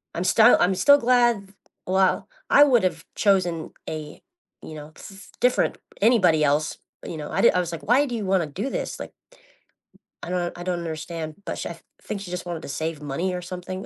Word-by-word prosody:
I'm 170 - -1
star 220 +5 +6
I'm 185 +2 +3
still 285 +9 +6
glad, 240 -6 +2 0.3
well, 190 0 +2 0.2
I 290 - +7
would've 240 -10 +2
chosen 180 -5 +1 0.2
a, 155 -1 -7 0.4
you - - -9
know, 150 0 -10
s 195 -1 -12
different, 250 +1 +2 0.2
anybody 185 -9 +4
else. 150 +1 +1 0.2
But, - - -7
you 165 - -6
know, 150 -1 -6
I - - 0
di - - +7
I 180 - +1
was 175 -2 -2
like, 165 -1 -7
"Why 255 +6 +3
do 245 -4 -4
you 215 -3 -3
wanna 190 -4 +1
do 195 - -4
this?" - - -4
Like - - -7 1.1
I - - -6
don't 175 -1 -2
I 175 - -7
don't 180 -1 -2
understand. 160 -1 -5
But - - -4
sh - - -4
I - - -8 0.2
think 200 - -5
she 185 -3 -8
just 180 0 -4
wanted 170 -2 -5
to - - -8
save 155 +2 -4
money 150 +6 -2
or 180 - -4
something. 185 +2 -6
180 Hz, 210 wpm, -24 LUFS, 160-200 Hz, 1.1 s, I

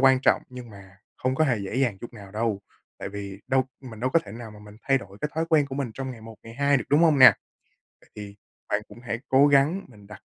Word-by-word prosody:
quan 135 -1 +5
trọng, - - +3
nhưng 125 -2 -10
mà 100 -1 -15 0.2
không 130 +1 0
có 155 - +2
hề 125 -7 +1
dễ 100 +3 -5
dàng 125 -7 0
chút 120 - -9
nào 100 -3 -12
đâu, 110 -2 -1 0.4
tại - - -5
vì 100 -1 -8
đâu 130 -1 +2 0.2
mình 115 -5 -11
đâu 130 +2 0
có 165 - +4
thể 100 - -10
nào 115 0 -9
mà 105 - -13
mình 105 0 -14
thay 135 -1 +2
đổi 100 -3 -13
cái 150 - -2
thói 160 +1 -1
quen 150 -3 +4
của 135 - -7
mình 135 -4 -3
trong 135 -1 -5
ngày 120 -3 -10
một, 110 0 -11
ngày 115 0 -12
hai 140 +2 +2
được, 130 - -3
đúng 145 +2 +5
hông 160 -4 +4
nè? 130 - +9 0.7
Vậy - - -24
thì 105 -1 -9 0.3
bạn 105 - 0
cũng 105 +3 -14
hãy 115 -1 -4
cố 135 +2 +6
gắng 145 +7 +3
mình 105 -4 -17
đặt 105 -2 -12
120 Hz, 275 wpm, -25 LUFS, 105-135 Hz, 0.7 s, nè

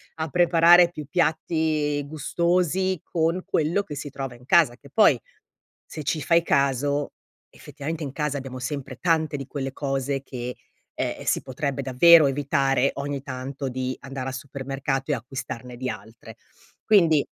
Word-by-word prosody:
a 160 0 -3
preparare 170 +2 +6
più 150 -3 -7
piatti 155 -3 0
gustosi 175 +4 0
con 165 +2 0
quello 165 +6 +1
che 150 - -8
si 145 +1 -6
trova 135 -2 -6
in 125 - -18
casa, 145 -4 +4
che 140 +2 -17
poi, 220 - +5 0.7
se 155 -2 -8
ci 150 +1 -1
fai 170 +3 +3
caso, 140 0 +1 0.4
effettivamente 155 +2 -7
in 140 -3 -4
casa 150 -2 -2
abbiamo 130 -1 -7
sempre 130 0 -5
tante 160 -4 +1
di 135 - -7
quelle 135 -1 -4
cose 135 -1 -2
che, 125 -2 -6 0.4
eh, - - -3
si - - +1
potrebbe 140 +1 -3
davvero 150 +5 +7
evitare, 135 -1 +1
ogni 140 0 -4
tanto 135 +1 -5
di 130 0 -3
andare 135 -1 -6
al - - -3
supermercato 135 +1 -4
e - - +3
acquistarne 125 0 -7
di 130 +1 -3
altre. 115 +1 -10 0.5
Quindi 165 -9 +5
140 Hz, 150 wpm, -24 LUFS, 135-160 Hz, 0.7 s, davvero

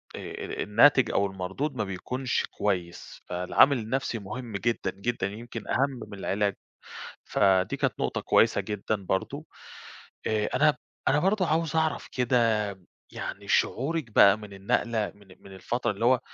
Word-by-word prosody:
آآ، - - -6 0.3
ال - - -4
الناتج 120 +4 +5
أو 100 - +2
المردود 95 +10 -3
ما 110 - -1
بيكونش 125 +7 -2
كويس، 90 -4 -3
فالعامل 90 +10 +3
النفْسِي 120 +1 -2
مهم 115 +4 -7
جدًا، 115 -3 -1
جدًا، 100 0 -2
يمكن 115 +2 -8
أهم 135 -1 0
من 100 - -9
العلاج. 100 +1 0 0.7
فدي 95 -2 +2
كانت - - -1
نقطة - - -1
كويسة - - +3
جدًا 105 +1 -2
برضه، 95 -1 -3 0.8
آآ، 110 -1 +1
أنا 150 +3 +4 0.3
أنا 145 - +4
برضه 190 +1 +2
عاوز 165 0 0
أعرف 160 -1 0
كده 125 -1 +1 0.7
يعني - - -6
شعورِك 140 -2 0
بقى 100 0 +7
من 105 -2 -11
النقلة 110 +2 -1
من 100 -1 -20
من 100 - -14
الفترة 120 +6 -2
اللي 105 +3 -2
هو 125 +1 +5
110 Hz, 145 wpm, -27 LUFS, 100-130 Hz, 0.8 s, بقى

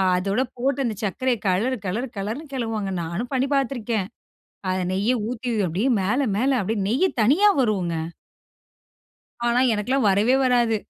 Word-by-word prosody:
அதோடு 200 +7 0
போட்டு 270 +2 0
அந்த 225 -3 -2
சர்க்கரைய 240 +5 0
கலரு, 225 +8 +1
கலரு, 220 +8 -2
கலருனு 220 +10 -4
கலருவாங்க. 225 -6 -2
நானும் 190 - -4
பண்ணி 265 +1 +1
பாத்துருக்கேன். 235 -7 -1 0.6
அத 185 - 0
நெய்ய 200 +6 +1 0.2
ஊத்தி 250 0 -4 0.2
அப்படியே 190 +10 0
மேல 215 +9 +1 0.2
மேல 260 +1 +2
அப்படியே 210 +2 -1
நெய் 265 - +2
தனியா 300 - +5
வரும்ங்க. 190 -8 0 1.5
ஆனா, 240 +1 +3
எனக்கலாம் 225 +4 +1
வரவே 210 +6 +3
வராது. 240 -3 +3
230 Hz, 140 wpm, -23 LUFS, 200-255 Hz, 1.5 s, தனியா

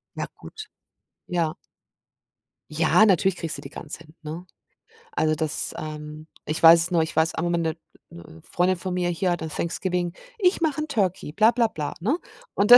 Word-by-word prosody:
Ja, - - -3
gut. 435 -1 -10 0.6
Ja. 165 -3 0 1.2
Ja. 160 +7 +4
Natürlich 190 -2 +3
kriegst 165 -3 -4
du - - -8
die - - -8
Gans 150 +1 -8
hin, 155 -1 -16
ne? 160 +4 -7 0.7
Also, 155 0 +2
das, 155 0 0
ähm 150 0 -7 0.2
ich 155 - -2
weiß 165 0 +9
es 170 +2 -1
nur 170 -2 +3
ich 160 - -3
weiß, 160 +2 +2
auch 165 - -1
am 175 0 0
Ende 165 -2 0 0.3
'ne 85 -1 -12
Freundin 180 +1 +1
von 185 +1 -4
mir 180 -1 0
hier 180 +2 0
hatte 160 -2 -2
Thanksgiving: 175 +2 -2 0.2
„Ich 370 -3 +3
mache 305 -2 +1
'n 305 - -3
Turkey,“ 195 - 0
bla 220 +7 +5
bla 235 -1 +2
bla, 150 -8 -4
ne? 250 - +1 0.4
Und 205 +3 +2
da - - +15
170 Hz, 190 wpm, -25 LUFS, 155-190 Hz, 1.2 s, da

